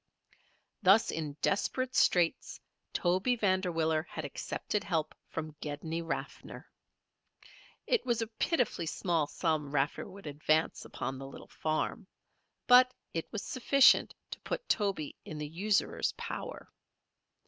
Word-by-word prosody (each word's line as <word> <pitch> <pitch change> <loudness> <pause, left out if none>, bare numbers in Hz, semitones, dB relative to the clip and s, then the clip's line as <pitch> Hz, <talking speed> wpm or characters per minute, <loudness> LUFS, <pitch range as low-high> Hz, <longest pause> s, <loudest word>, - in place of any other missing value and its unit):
Thus 205 +3 +5
in 155 -3 -3
desperate 255 +6 0
straits 175 -2 +2 0.3
Toby 185 +8 +1
Vanderwiller 180 -7 +1
had 155 - -5
accepted 200 +8 -3
help 160 -4 -1 0.2
from 155 -2 -5
Gedney 160 +3 -4
Raffer. 165 0 -5 1.2
It 485 - +2
was 240 -3 0
a 225 - 0 0.2
pitifully 245 - +1
small 165 -3 0
sum 155 -2 -1
Raffer 145 +6 -1
would 195 0 -12
advance 155 +2 0
upon 130 0 -5
the 135 - -7
little 135 - -11
farm; 155 0 -2 0.6
but 250 +1 +7 0.2
it 165 - -4
was 215 - -4
sufficient 270 +2 +4 0.2
to - - -6
put - - -4
Toby 195 -8 0
in 155 - -7
the 150 0 -4
usurer's 195 +6 0
power. - - -7
170 Hz, 125 wpm, -31 LUFS, 155-210 Hz, 1.2 s, but